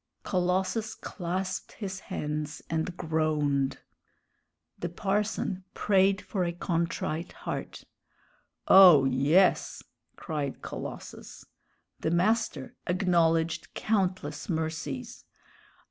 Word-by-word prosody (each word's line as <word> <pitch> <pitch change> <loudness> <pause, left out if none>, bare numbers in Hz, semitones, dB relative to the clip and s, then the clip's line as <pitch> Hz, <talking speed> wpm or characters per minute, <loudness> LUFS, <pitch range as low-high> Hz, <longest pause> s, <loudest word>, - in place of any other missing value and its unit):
Colossus 185 +4 0
clasped 185 +1 -4
his 195 -3 -5
hands 150 -5 -4
and 165 +2 -2
groaned. 150 -4 0 1.0
The 175 - -3
parson 195 0 -1
prayed 195 0 +3
for 190 -3 -2
a 170 - 0
contrite 170 -1 -2
heart. - - -6 0.8
"Oh, 180 -8 +9
yes!" 140 +8 +3 0.3
cried 150 -5 -4
Colossus. - - -8 0.5
The - - -1
master 175 - +1
acknowledged 165 -3 +1
countless 185 -8 -1
mercies. 160 -5 -3
170 Hz, 85 wpm, -28 LUFS, 155-190 Hz, 1.0 s, Oh